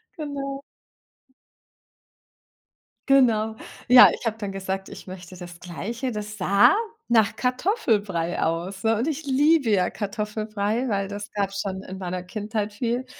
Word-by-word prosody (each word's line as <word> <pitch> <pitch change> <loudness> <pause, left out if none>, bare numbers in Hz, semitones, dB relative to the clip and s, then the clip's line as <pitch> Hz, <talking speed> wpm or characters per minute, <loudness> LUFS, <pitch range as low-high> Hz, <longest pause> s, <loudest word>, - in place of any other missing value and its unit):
Genau. 280 -3 -5 2.5
Genau. 220 -5 +4 0.3
Ja, 250 0 +10
ich - - -7
habe 220 0 0
dann 205 -3 -5
gesagt, 190 0 -4
ich - - -10
möchte 185 -1 -10
das 175 -1 -10
Gleiche, 230 - -4
das 210 0 -6
sah 200 - +5 0.4
nach 220 -3 +3
Kartoffelbrei 220 - 0
aus, 175 +4 -2
ne? 225 0 +3
Und 260 +7 0
ich 315 0 -3
liebe 285 -1 +3
ja 185 -3 +3
Kartoffelbrei, 215 +3 -2
weil 195 -1 -1
das 205 0 -7
gab's 195 -1 -2
schon 190 -1 -4
in 190 - -8
meiner 180 -1 -4
Kindheit 210 +2 -4
viel. 240 +4 -2
210 Hz, 135 wpm, -24 LUFS, 190-245 Hz, 2.5 s, Ja